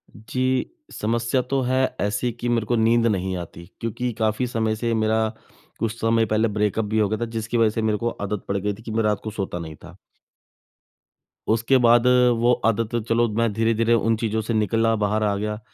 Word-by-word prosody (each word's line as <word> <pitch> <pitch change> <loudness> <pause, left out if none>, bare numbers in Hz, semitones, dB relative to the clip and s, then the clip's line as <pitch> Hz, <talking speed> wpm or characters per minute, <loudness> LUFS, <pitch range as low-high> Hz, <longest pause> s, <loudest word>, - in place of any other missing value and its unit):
जी, 130 - -1 0.2
समस्या 120 +4 0
तो 135 +2 -1
है 130 +1 +1 0.2
ऐसी 105 +4 0
कि 120 +1 -4
मेरे 115 -2 +1
को 120 - 0
नींद 115 +1 +3
नहीं 95 -3 -1
आती, 85 0 -8
क्योंकि 120 +2 -3
काफ़ी 110 +3 0
समय 110 -2 -1
से 115 +1 -1
मेरा 110 0 +1 0.5
कुछ 115 +1 -2
समय 115 0 +2
पहले 110 +1 +1
ब्रेकअप 105 +1 0
भी 110 +1 -2
हो 105 - +3
गया 110 - -2
था - - +1
जिसकी 115 +1 -2
वज़ह 115 -1 +4
से 115 - 0
मेरे 110 -1 +1
को 120 +2 -1
आदत 100 -1 -4
पड़ 100 - -1
गई 105 +1 -1
थी 110 +3 -14
कि 115 - -6
मैं 110 0 0
रात 105 -1 +1
को 110 - -4
सोता 95 -4 -4
नहीं 80 -2 -7
था। - - -14 1.6
उसके 115 +4 +3
बाद 120 0 +4 0.3
वो 120 +1 +3
आदत 115 0 0
चलो 115 +1 +3
मैं 115 -1 +2
धीरे-धीरे 115 +1 +2
उन 115 0 +2
चीज़ों 110 -1 -1
से 115 +2 -3
निकला, 115 +1 +2
बाहर 105 0 0
आ 100 -1 +1
गया। 105 +1 -3
110 Hz, 205 wpm, -23 LUFS, 105-115 Hz, 1.6 s, वज़ह